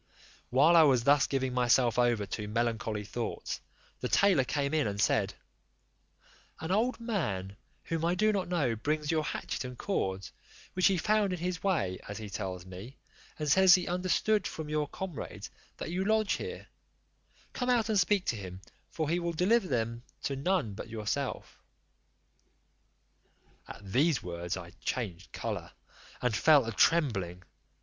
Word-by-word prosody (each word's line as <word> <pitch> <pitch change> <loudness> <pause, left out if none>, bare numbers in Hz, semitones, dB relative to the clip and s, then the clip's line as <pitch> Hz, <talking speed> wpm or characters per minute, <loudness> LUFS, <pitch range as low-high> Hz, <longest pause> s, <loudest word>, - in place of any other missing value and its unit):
While 145 +7 +5
I 165 - +9
was 135 -6 +4
thus 140 +2 +4
giving 130 -2 -1
myself 125 -1 +3
over 120 -4 +2
to 105 +1 -5
melancholy 110 -1 -1
thoughts, 115 +2 -4 0.4
the - - -2
tailor 190 -9 +4
came 140 +2 -1
in 155 -5 +2
and 100 0 -4
said, - - +2 1.2
"An 160 +2 -4
old 230 +7 +1
man, 105 - -2 0.3
whom 165 -1 -3
I 170 +2 +2
do 215 +3 +3
not 195 -3 -1
know, 150 -10 0
brings 150 +6 -1
your 155 -1 +1
hatchet - - -4
and 125 -1 -7
cords, 95 - -2 0.4
which 185 - +4
he 195 -2 +2
found 210 0 +2
in - - -2
his 180 0 -3
way 150 - 0
as 100 - -6
he 105 -2 -7
tells 95 -3 -4
me, 95 +8 -10 0.4
and 150 - -3
says 190 +4 +7
he 180 - -1
understood 185 +4 +1
from 155 -2 -6
your 150 -1 0
comrades 185 0 -7 0.3
that - - -5
you 185 +2 -1
lodge 215 0 +2
here; 460 +2 -5 0.9
come 250 -1 -2
out 240 -3 +3
and 215 -3 +2
speak 190 +1 +2
to - - 0
him, 95 -3 -7 0.3
for 155 -2 -2
he 170 +3 +1
will 170 -1 -2
deliver 190 +6 +2
them 115 -3 -1 0.2
to 140 - -1
none 140 - 0
but 110 - -8
yourself." 115 +5 -4 2.1
At 100 -1 -10
these 145 +1 +3
words 85 0 -4
I 85 -2 -9
changed 95 -8 -3
colour, - - -5 0.5
and 125 -3 +1
fell 145 +2 +5
a 115 - -3
trembling. 105 - +2
140 Hz, 160 wpm, -30 LUFS, 110-180 Hz, 2.1 s, I